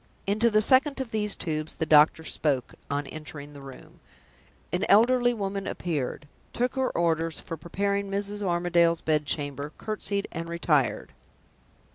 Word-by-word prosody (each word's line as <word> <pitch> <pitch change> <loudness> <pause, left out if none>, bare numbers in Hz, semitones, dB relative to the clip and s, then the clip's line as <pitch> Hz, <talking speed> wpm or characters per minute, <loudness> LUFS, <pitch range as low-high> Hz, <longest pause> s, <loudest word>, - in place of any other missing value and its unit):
Into 215 +4 +2
the 215 -1 +4
second 275 +4 +4
of 260 -4 -4
these 210 -2 +2
tubes 155 -2 -3
the 160 - -2
doctor 155 +1 +5
spoke, 140 -5 -1 0.2
on 145 0 -1
entering 145 0 -9
the 140 - -11
room. 135 -1 -13 0.7
An 180 - 0
elderly 245 +4 +5
woman 200 -3 -3
appeared, 150 -3 -3 0.3
took 250 +1 0
her 265 -1 0
orders 165 -1 0
for 165 - -6
preparing 200 +5 -2
Mrs. 200 +1 -3
Armadale's 175 -2 +2
bed 150 -2 0
chamber, 145 0 -3
courtesied, 205 -2 -3
and 165 0 -5
retired. 155 - 0
170 Hz, 145 wpm, -27 LUFS, 150-205 Hz, 0.7 s, doctor